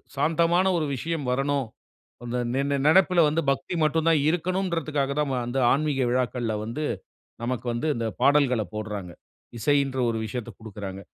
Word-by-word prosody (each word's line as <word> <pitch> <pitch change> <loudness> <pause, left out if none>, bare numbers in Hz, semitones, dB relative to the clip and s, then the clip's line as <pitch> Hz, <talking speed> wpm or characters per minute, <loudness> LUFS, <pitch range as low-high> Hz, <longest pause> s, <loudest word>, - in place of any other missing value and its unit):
சாந்தமான 165 +5 +2
ஒரு 155 - 0
விஷயம் 155 0 -3
வரணும். 135 -1 0 0.6
அந்த 120 +1 -3 0.2
நி 135 - +1
நி 140 - +2
நினைப்பில 180 +1 +5
வந்து 160 +2 0
பக்தி 140 +6 -2
மட்டும் 160 +1 +1
தான் 160 -3 +4
இருக்கணும்ன்றதுக்காக 165 -5 -1
தான், 150 - 0
ம - - 0
அந்த 125 +2 -2
ஆன்மீக 140 -3 +1
விழாக்கள்ல 120 -2 0
வந்து, 130 +8 -4 0.6
நமக்கு 125 0 -3
வந்து, 120 +7 -2
இந்த 115 -1 -2 0.2
பாடல்களப் 130 -7 +3
போட்றாங்க. 105 -4 -5 0.5
இசைன்ற 140 0 +1
ஒரு 115 - -2
விஷயத்தக் 120 +1 -6
குடுக்குறாங்க. 100 -3 -7
140 Hz, 150 wpm, -25 LUFS, 120-155 Hz, 0.6 s, நினைப்பில